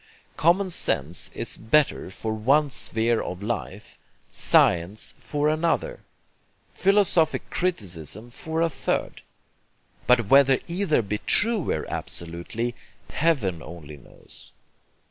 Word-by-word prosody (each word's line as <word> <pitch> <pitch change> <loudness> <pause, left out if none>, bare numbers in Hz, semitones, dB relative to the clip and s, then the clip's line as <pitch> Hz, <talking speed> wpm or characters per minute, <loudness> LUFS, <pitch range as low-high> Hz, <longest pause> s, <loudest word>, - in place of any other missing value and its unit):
Common 185 +4 +2
sense 80 - -1
is - - -3
BETTER 140 +2 +1
for 110 +4 -4
one 140 +7 +2
sphere 115 -1 +1
of 90 +2 -6
life, 105 -2 -5 0.3
science 90 +5 +2
for 150 0 -1
another, 165 - 0 0.7
philosophic 190 -5 +2
criticism 110 - -2
for 160 +6 -2
a 165 - +2
third; - - -2 0.9
but 125 -2 +4
whether 135 +1 +6
either 170 - +1
be 105 +1 -3
TRUER 205 - +1
absolutely, 85 +8 -4 0.4
Heaven 125 - 0
only 75 -3 -10
knows. 70 - -13
120 Hz, 105 wpm, -25 LUFS, -, 0.9 s, whether